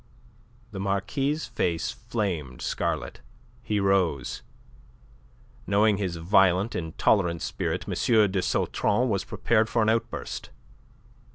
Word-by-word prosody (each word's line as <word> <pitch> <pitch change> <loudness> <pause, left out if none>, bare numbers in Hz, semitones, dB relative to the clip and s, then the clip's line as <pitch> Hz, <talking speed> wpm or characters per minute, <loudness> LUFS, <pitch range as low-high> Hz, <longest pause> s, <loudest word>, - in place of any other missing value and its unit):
The 100 - -6
Marquis' 100 +9 -1
face 85 -2 -1
flamed 85 - -4
scarlet. - - -2 0.4
He 110 -4 -1
rose. 95 -9 +1 1.3
Knowing 105 +1 +3
his 95 -4 -2
violent, 95 +4 +3
intolerant 85 +1 +1
spirit, - - -2
M. - - -2 0.4
de 95 -1 0
Sautron 120 +6 +1
was 100 -3 0
prepared 115 -1 +1
for 115 - +2
an 110 - +2
outburst. 115 +1 -2
100 Hz, 105 wpm, -26 LUFS, 90-110 Hz, 1.3 s, Knowing